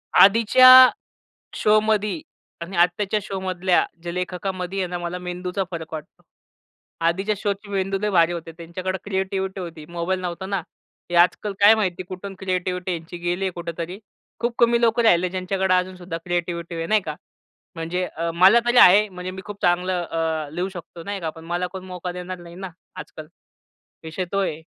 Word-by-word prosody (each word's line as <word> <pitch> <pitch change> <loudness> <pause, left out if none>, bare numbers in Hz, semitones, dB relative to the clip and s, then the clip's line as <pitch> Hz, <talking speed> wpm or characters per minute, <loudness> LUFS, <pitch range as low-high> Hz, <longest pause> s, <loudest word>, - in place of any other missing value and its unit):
आधीच्या 255 +5 +8 0.7
शोमधी 215 +3 +2 0.4
आणि 175 +3 -6
आत्ताच्या 185 +4 +2
शोमधल्या 185 -2 0 0.2
जे 170 0 -5
लेखकामध्ये 180 +1 -4
आहे 185 - 0
ना, 175 0 -4
मला 175 +1 -4
मेंदूचा 180 +2 -4
फरक 165 -2 -7
वाटतो. 155 -2 -9 0.8
आधीच्या 195 +5 +1
शोची 205 0 -3
मेंदू 195 0 -1
लय 210 0 0
भारी 170 -2 +4
होते 165 -1 -6
त्यांच्याकडे 185 +3 -4
क्रिएटिविटी 190 -1 -2
होती, 165 -3 -8
मोबाईल 175 +2 -2
नव्हता 180 +1 -5
ना. 195 -1 -1 0.5
हे 175 - -1
आजकाल 180 +4 +3
काय 210 +2 +8
माहिती, 185 -4 -1
कुठून 195 +1 -7
क्रिएटिविटी 185 -1 -2
यांची 165 0 -6
गेली 175 +2 -2
आहे 190 - 0
कुठेतरी. 170 +2 -5 0.4
खूप 235 0 -1
कमी 235 0 +4
लोकं 235 0 +3
राहिले 180 -5 +4
ज्यांच्याकडे 185 0 0
अजूनसुद्धा 180 -1 -2
क्रिएटिविटी 175 -1 -3
आहे, 165 0 -3
नाही 215 +2 +3
का? 155 -4 -5 0.6
म्हणजे 170 +2 -2
अ, 165 +1 -1
मला 185 +6 +7
तरी 240 +1 +2
आहे 205 +2 +7
म्हणजे 180 -1 -7
मी 190 +1 -8
खूप 205 +1 -9
चांगलं 180 +1 +1
अ, 160 -2 -2
लिहू 180 +3 -1
शकतो, 175 -2 -10
नाही 200 -1 -4
का? 165 -2 -3
पण 160 +1 -13
मला 175 +2 -2
कोण 190 -1 -7
मौका 180 -1 -6
देणार 180 +1 -6
नाही 170 -1 -12
ना 190 +1 -7 0.3
आजकाल, 155 -4 -9 0.8
विषय 165 +3 -4
तो 200 - 0
आहे. 160 -4 -3
185 Hz, 170 wpm, -23 LUFS, 175-195 Hz, 0.8 s, आधीच्या